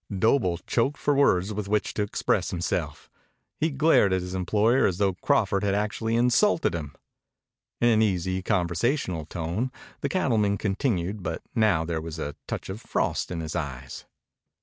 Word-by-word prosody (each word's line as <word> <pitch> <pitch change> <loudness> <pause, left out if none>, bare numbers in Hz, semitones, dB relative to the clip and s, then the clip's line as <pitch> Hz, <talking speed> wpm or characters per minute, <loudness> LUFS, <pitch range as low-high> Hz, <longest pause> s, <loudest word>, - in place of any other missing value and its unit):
Doble 95 -4 +2
choked 120 - -1
for 145 - +1
words 105 -8 +3
with 105 -1 -4
which 105 +1 0
to - - -2
express 105 - 0
himself. - - -3 0.5
He 160 - +2
glared 140 -8 +4
at 95 -1 0
his 90 0 -6
employer 105 +7 +2
as 90 - -2
though 100 -1 +2
Crawford 100 +2 +1
had 100 -1 +1
actually 105 +2 -1
insulted 125 - +3
him. 75 -4 -5 0.8
In 120 - +4
an 110 -1 +4
easy, 95 -3 0
conversational 90 - 0
tone 85 +10 -3 0.3
the - - -2
cattleman 110 - +1
continued, 100 -2 -1
but - - -4
now 100 -8 +2
there 80 -1 -2
was 80 0 -6
a 75 -2 -4
touch - - -4
of 95 +4 -6
frost - - -1
in 85 -2 -4
his 80 0 -5
eyes. 70 -3 -5
100 Hz, 165 wpm, -26 LUFS, 85-115 Hz, 0.8 s, glared